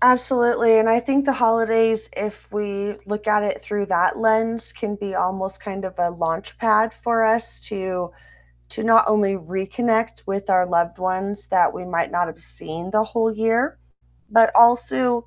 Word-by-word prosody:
Absolutely, 240 Hz, -2 st, +4 dB
and 220 Hz, +1 st, +3 dB
I 230 Hz, -, +4 dB
think 275 Hz, +3 st, +1 dB
the 275 Hz, -, +2 dB
holidays, 225 Hz, -2 st, +2 dB
if 210 Hz, +1 st, -6 dB
we 205 Hz, 0 st, -4 dB
look 210 Hz, +1 st, -5 dB
at 210 Hz, 0 st, +3 dB
it 200 Hz, -, -3 dB
through 205 Hz, -1 st, -3 dB
that 185 Hz, 0 st, +1 dB
lens, 225 Hz, +1 st, +1 dB
can 205 Hz, -2 st, -5 dB
be 200 Hz, -2 st, -6 dB
almost 190 Hz, +1 st, -3 dB
kind 195 Hz, -1 st, -7 dB
of 185 Hz, 0 st, -6 dB
a 175 Hz, -1 st, +1 dB
launchpad 215 Hz, +7 st, 0 dB
for 230 Hz, -1 st, 0 dB
us 225 Hz, +1 st, 0 dB
to 185 Hz, -3 st, -4 dB, 0.6 s
to -, -, -5 dB
not 225 Hz, 0 st, +5 dB
only 210 Hz, -2 st, +2 dB
reconnect 195 Hz, +6 st, -2 dB
with 195 Hz, +1 st, -4 dB
our 185 Hz, -1 st, +3 dB
loved 170 Hz, -1 st, 0 dB
ones 190 Hz, +2 st, -3 dB
that 180 Hz, -2 st, +3 dB
we 180 Hz, -, -8 dB
might 170 Hz, -2 st, -2 dB
not 175 Hz, 0 st, 0 dB
have 160 Hz, -, -10 dB
seen 155 Hz, -, -7 dB
the 215 Hz, +1 st, +2 dB
whole 225 Hz, 0 st, -1 dB
year, 225 Hz, -, 0 dB, 0.5 s
but 225 Hz, +1 st, +5 dB
also 240 Hz, 0 st, +3 dB
210 Hz, 170 wpm, -21 LUFS, 190-225 Hz, 0.6 s, not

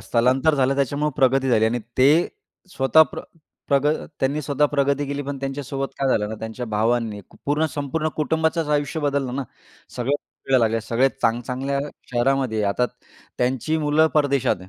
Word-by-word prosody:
स्थलांतर 130 Hz, +6 st, +2 dB
झालं 135 Hz, -1 st, +2 dB
त्याच्यामुळं 140 Hz, +2 st, 0 dB
प्रगती 135 Hz, 0 st, +3 dB
झाली 110 Hz, -3 st, +3 dB
आणि 115 Hz, +2 st, +1 dB, 0.2 s
ते 130 Hz, -, +6 dB, 0.7 s
स्वतः 135 Hz, +4 st, +6 dB
प्र -, -, -5 dB, 0.5 s
प्रग 140 Hz, 0 st, +3 dB, 0.3 s
त्यांनी 140 Hz, +3 st, 0 dB
स्वतः 145 Hz, +1 st, +2 dB
प्रगती 140 Hz, 0 st, +1 dB
केली. 140 Hz, +1 st, -3 dB
पण 140 Hz, 0 st, -5 dB
त्यांच्यासोबत 135 Hz, 0 st, -4 dB
काय 135 Hz, -, +1 dB
झालं 105 Hz, -5 st, +1 dB
ना, 110 Hz, -, -4 dB
त्यांच्या 110 Hz, +2 st, -5 dB
भावांनी 110 Hz, -1 st, 0 dB, 0.2 s
पूर्ण 150 Hz, +2 st, +1 dB
संपूर्ण 150 Hz, +2 st, -1 dB
कुटुंबाचंच 160 Hz, +1 st, 0 dB
आयुष्य 145 Hz, +3 st, -2 dB
बदललं 140 Hz, -3 st, -1 dB
ना. 140 Hz, -, -1 dB, 0.5 s
सगळे 125 Hz, +3 st, -1 dB
फिरायला 135 Hz, -2 st, -1 dB
लागले. 115 Hz, 0 st, 0 dB
सगळे 115 Hz, +4 st, +2 dB
चांग 115 Hz, +1 st, +2 dB
चांगल्या 135 Hz, +3 st, -2 dB, 0.3 s
शहरामध्ये 125 Hz, -1 st, +1 dB
आहे. -, -, +1 dB
आता 125 Hz, +5 st, +1 dB, 0.5 s
त्यांची 130 Hz, +5 st, 0 dB
मुलं 150 Hz, +1 st, +3 dB
परदेशात 140 Hz, -3 st, +2 dB
आहे. 90 Hz, -, -13 dB
135 Hz, 165 wpm, -23 LUFS, 125-145 Hz, 0.7 s, ते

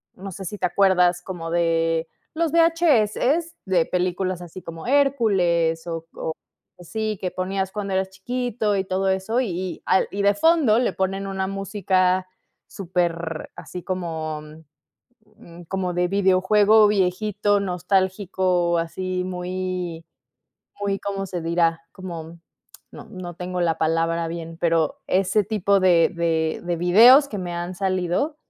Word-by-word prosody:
no 195 Hz, +1 st, -8 dB
sé 190 Hz, +2 st, -8 dB
si 210 Hz, +4 st, -5 dB
te 185 Hz, -, -1 dB
acuerdas, 180 Hz, -2 st, +3 dB
como 175 Hz, -3 st, -6 dB
de 165 Hz, -1 st, +1 dB, 0.3 s
los 325 Hz, -1 st, -1 dB
VHS, 330 Hz, -1 st, +2 dB
de 180 Hz, -4 st, +2 dB
películas 180 Hz, 0 st, -1 dB
así 175 Hz, +1 st, -9 dB
como 165 Hz, +4 st, -9 dB
Hércules, 195 Hz, -13 st, +2 dB
o 165 Hz, -1 st, -4 dB
co 160 Hz, -, -4 dB, 0.5 s
así, 215 Hz, +4 st, -3 dB
que 185 Hz, -, -3 dB
ponías 190 Hz, +1 st, -2 dB
cuando 200 Hz, -2 st, -3 dB
eras 190 Hz, 0 st, 0 dB
chiquito 220 Hz, 0 st, -2 dB
y 190 Hz, -, -1 dB
todo 190 Hz, +1 st, 0 dB
eso. 190 Hz, +6 st, 0 dB
Y 245 Hz, -, -1 dB
y 180 Hz, +1 st, -4 dB
al 190 Hz, -, +3 dB
y 200 Hz, -, -3 dB
de 200 Hz, 0 st, +3 dB
fondo 310 Hz, -8 st, +4 dB
le 250 Hz, -, 0 dB
ponen 195 Hz, +1 st, -2 dB
una 190 Hz, -1 st, -2 dB
música 190 Hz, -2 st, 0 dB, 0.4 s
súper 170 Hz, -3 st, -2 dB
así 180 Hz, -, -8 dB
como, 160 Hz, -4 st, -4 dB
mm, 155 Hz, +1 st, -13 dB, 0.8 s
mm, 170 Hz, +1 st, -13 dB
como 185 Hz, 0 st, -2 dB
de 180 Hz, 0 st, +1 dB
videojuego 200 Hz, +3 st, +4 dB
viejito, 205 Hz, +1 st, +1 dB
nostálgico, 185 Hz, -1 st, 0 dB
así 185 Hz, +2 st, -3 dB
muy, 180 Hz, -2 st, -4 dB, 0.8 s
muy, 195 Hz, -1 st, -1 dB
¿cómo 195 Hz, -1 st, -3 dB
se 180 Hz, -2 st, -5 dB
dirá?, 165 Hz, 0 st, +1 dB
como 170 Hz, -3 st, -8 dB, 0.5 s
no -, -, -11 dB
no 185 Hz, -3 st, -7 dB
tengo 180 Hz, 0 st, -4 dB
la 165 Hz, -2 st, +1 dB
palabra 165 Hz, +1 st, 0 dB
bien, 165 Hz, 0 st, -7 dB
pero, 165 Hz, -3 st, +1 dB
ese 195 Hz, +2 st, +2 dB
tipo 200 Hz, -1 st, +2 dB
de 175 Hz, -3 st, +4 dB
de 165 Hz, -2 st, -1 dB
de 175 Hz, 0 st, -1 dB
videos 230 Hz, -, +7 dB
que 205 Hz, -, -5 dB
me 175 Hz, -1 st, -5 dB
han 175 Hz, +1 st, -4 dB
salido 185 Hz, -, -1 dB
185 Hz, 145 wpm, -23 LUFS, 170-200 Hz, 0.8 s, videos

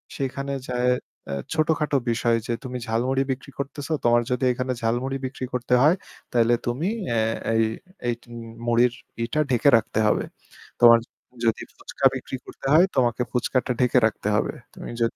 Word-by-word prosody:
সেখানে 135 Hz, +1 st, -3 dB
যায়ে 125 Hz, 0 st, +1 dB, 0.4 s
অ্যা -, -, -3 dB, 0.2 s
ছোটখাটো 155 Hz, -2 st, +1 dB
বিষয় 115 Hz, 0 st, +2 dB
যে 120 Hz, -, 0 dB
তুমি 125 Hz, -1 st, -5 dB
ঝালমুড়ি 125 Hz, +4 st, +1 dB
বিক্রি 135 Hz, +2 st, -6 dB
করতেছো, 140 Hz, +3 st, -4 dB
তোমার 120 Hz, 0 st, +4 dB
যদি 125 Hz, +1 st, 0 dB
এখানে 125 Hz, +1 st, -2 dB
ঝালমুড়ি 120 Hz, +4 st, 0 dB
বিক্রি 130 Hz, 0 st, -4 dB
করতে 125 Hz, 0 st, -1 dB
হয় 155 Hz, +5 st, +6 dB, 0.4 s
তাইলে 120 Hz, 0 st, +3 dB
তুমি 125 Hz, +9 st, -1 dB, 0.2 s
অ্যা 115 Hz, -, +1 dB, 0.4 s
এই, 115 Hz, -, +4 dB, 0.4 s
এই 120 Hz, -, +2 dB
তুমি 120 Hz, -1 st, -10 dB, 0.3 s
মুড়ির 120 Hz, +1 st, +4 dB, 0.3 s
ইটা 120 Hz, +6 st, -1 dB
ঢেকে 125 Hz, +3 st, +4 dB
রাখতে 110 Hz, -1 st, -2 dB
হবে। -, -, +2 dB, 0.6 s
তোমার 115 Hz, -1 st, +9 dB, 0.5 s
যদি 115 Hz, -, +1 dB
ফুচকা 140 Hz, -, -4 dB
বিক্রি 130 Hz, 0 st, -5 dB
করতে -, -, -12 dB
হয়, 165 Hz, +4 st, +7 dB
তোমাকে 120 Hz, -2 st, +2 dB
ফুচকাটা 125 Hz, +1 st, 0 dB
ঢেকে 125 Hz, 0 st, +3 dB
রাখতে 110 Hz, -2 st, -1 dB
হবে। -, -, 0 dB, 0.2 s
তুমি -, -, -8 dB
যদি 115 Hz, -, +1 dB
125 Hz, 160 wpm, -24 LUFS, 120-135 Hz, 0.6 s, তোমার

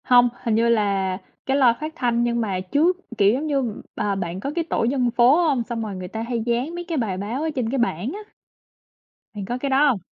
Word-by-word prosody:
Hông, 245 Hz, -1 st, +5 dB
hình 230 Hz, -3 st, +1 dB
như 230 Hz, +1 st, +3 dB
là 200 Hz, -4 st, +1 dB, 0.3 s
cái 270 Hz, +1 st, +1 dB
loa 250 Hz, -4 st, +5 dB
phát 310 Hz, +1 st, -4 dB
thanh 240 Hz, -4 st, +1 dB
nhưng 235 Hz, 0 st, 0 dB
mà 195 Hz, -4 st, -1 dB
trước, 295 Hz, -, +1 dB, 0.2 s
kiểu, 200 Hz, +1 st, +5 dB
giống 285 Hz, +5 st, -2 dB
như 270 Hz, -7 st, -1 dB
à, 200 Hz, -1 st, -1 dB
bạn 180 Hz, -1 st, -4 dB
có 275 Hz, +8 st, -3 dB
cái 340 Hz, -, +1 dB
tổ -, -, 0 dB
dân 245 Hz, 0 st, +1 dB
phố 245 Hz, +3 st, +5 dB
hông? 265 Hz, -6 st, +1 dB
Xong 230 Hz, -1 st, -4 dB
rồi 205 Hz, -3 st, -5 dB
người 185 Hz, -1 st, -6 dB
ta 220 Hz, +4 st, -5 dB
hay 230 Hz, -1 st, -2 dB
dán 245 Hz, +7 st, -1 dB
mấy 350 Hz, 0 st, -5 dB
cái 330 Hz, -3 st, -2 dB
bài 210 Hz, -7 st, -1 dB
báo 215 Hz, +8 st, -3 dB
ở 320 Hz, -, 0 dB
trên 245 Hz, -4 st, -1 dB
cái 270 Hz, -, 0 dB
bảng 235 Hz, -, -1 dB
á. 410 Hz, -, -6 dB, 1.2 s
Bạn 200 Hz, -2 st, -5 dB
có 240 Hz, +5 st, -3 dB
cái 275 Hz, +2 st, -3 dB
đó 275 Hz, +3 st, +4 dB
hông? 235 Hz, -7 st, +1 dB
235 Hz, 250 wpm, -23 LUFS, 210-270 Hz, 1.2 s, Hông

